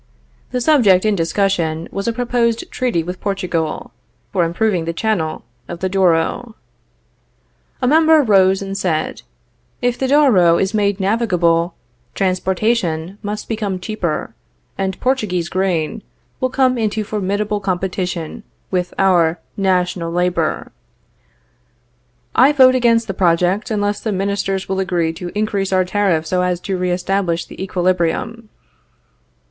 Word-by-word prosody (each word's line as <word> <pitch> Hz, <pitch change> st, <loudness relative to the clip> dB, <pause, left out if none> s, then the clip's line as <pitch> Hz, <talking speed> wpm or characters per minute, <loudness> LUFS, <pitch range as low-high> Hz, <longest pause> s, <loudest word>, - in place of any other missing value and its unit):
The 250 Hz, 0 st, -2 dB
subject 225 Hz, -10 st, +4 dB
in 215 Hz, -, +3 dB
discussion 170 Hz, -2 st, 0 dB
was 195 Hz, +2 st, -4 dB
a -, -, +2 dB
proposed 235 Hz, -1 st, -1 dB
treaty 240 Hz, -10 st, -1 dB
with 180 Hz, +2 st, -6 dB
Portugal, 180 Hz, -6 st, -2 dB, 0.4 s
for 185 Hz, -3 st, +2 dB
improving 175 Hz, +1 st, 0 dB
the 170 Hz, -, -2 dB
channel 175 Hz, -8 st, -1 dB, 0.2 s
of 175 Hz, -, -7 dB
the 190 Hz, -, -1 dB
Douro. 190 Hz, +5 st, +1 dB, 1.3 s
A -, -, +3 dB
member 315 Hz, +1 st, +5 dB
rose 195 Hz, -3 st, +3 dB
and 195 Hz, 0 st, -5 dB
said: 175 Hz, -5 st, -2 dB, 0.6 s
If 245 Hz, 0 st, -1 dB
the 265 Hz, -, 0 dB
Douro 235 Hz, -, +5 dB
is 190 Hz, +2 st, 0 dB
made 205 Hz, -2 st, +1 dB
navigable, 180 Hz, -5 st, +1 dB, 0.4 s
transportation 185 Hz, -, -1 dB
must 210 Hz, +1 st, -5 dB
become 210 Hz, -4 st, -2 dB
cheaper, 180 Hz, -, -3 dB, 0.4 s
and 190 Hz, -1 st, -3 dB
Portuguese 210 Hz, -10 st, -1 dB
grain 185 Hz, +1 st, -1 dB, 0.4 s
will 255 Hz, -, 0 dB
come 255 Hz, -1 st, +2 dB
into 215 Hz, -1 st, -1 dB
formidable 205 Hz, 0 st, -2 dB
competition 185 Hz, -1 st, -3 dB, 0.3 s
with 180 Hz, -1 st, -2 dB
our 175 Hz, -4 st, +3 dB, 0.2 s
national 180 Hz, -3 st, 0 dB
labor. 175 Hz, -2 st, -1 dB, 1.6 s
I 270 Hz, +4 st, +6 dB
vote 260 Hz, -2 st, +6 dB
against 235 Hz, -2 st, +3 dB
the 195 Hz, -, -4 dB
project, 180 Hz, +3 st, +1 dB
unless 205 Hz, -1 st, -1 dB
ministers 195 Hz, -2 st, -1 dB
will 190 Hz, 0 st, -2 dB
agree 175 Hz, -4 st, 0 dB
to 175 Hz, +2 st, -6 dB
increase 205 Hz, -2 st, -1 dB
our 185 Hz, -1 st, +2 dB
tariff 180 Hz, -4 st, +1 dB
so 180 Hz, +2 st, 0 dB
as 180 Hz, -1 st, 0 dB
to 195 Hz, -, -3 dB
re 180 Hz, 0 st, -1 dB
establish 180 Hz, -1 st, -1 dB
the -, -, -11 dB
equilibrium. 185 Hz, +5 st, -1 dB
190 Hz, 130 wpm, -18 LUFS, 175-215 Hz, 1.6 s, I